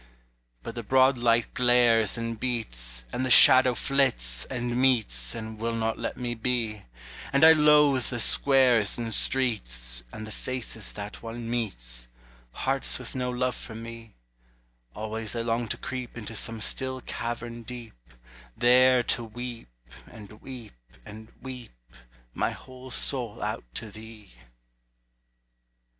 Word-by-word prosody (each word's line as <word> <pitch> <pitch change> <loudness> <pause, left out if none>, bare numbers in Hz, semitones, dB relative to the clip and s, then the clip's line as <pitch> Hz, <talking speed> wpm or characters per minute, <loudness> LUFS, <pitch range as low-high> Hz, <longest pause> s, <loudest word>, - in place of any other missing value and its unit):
But - - -6
the 120 - -5
broad 130 +3 +3
light 120 -1 +2
glares 120 -4 +3
and 115 -1 -4
beats, - - -3
And 130 - -1
the 130 - -1
shadow 130 +1 +8
flits 110 - 0
and 120 -1 -3
Meets 110 - +1
And 110 -1 -7
will 115 +1 -2
not 110 0 -1
let - - -4
me 120 -1 -3
be; 115 -3 -2 0.5
And 140 +3 +5
I 160 - +10
loathe 150 -4 +5
the 120 - -3
squares 125 -5 +3
and 115 -2 -3
streets, 65 - -1
And 110 - -7
the 110 - -9
faces 115 -4 -5
that 105 0 -8
one 115 0 -7
meets, - - -2 0.4
Hearts 135 - -1
with 125 - -8
no 125 -1 -2
love 125 0 -1
for 110 - -9
me; 115 -1 -9 0.8
Always 110 +1 -4
I 115 - -2
long 115 0 -1
to - - -3
creep 130 -2 -6
Into 115 -1 -7
some 115 +1 -3
still 130 +3 -1
cavern 120 0 -5
deep, 120 -1 -9 0.6
There 125 +1 +5
to 120 - 0
weep, 120 - -7 0.4
and 105 0 -13
weep, 125 -5 -10 0.3
and 110 +1 -11
weep 125 - -8 0.6
My - - 0
whole 130 0 -11
soul 125 -4 +1
out - - -3
to 110 -2 -5
thee. 110 -1 -12
115 Hz, 140 wpm, -27 LUFS, 110-125 Hz, 0.8 s, I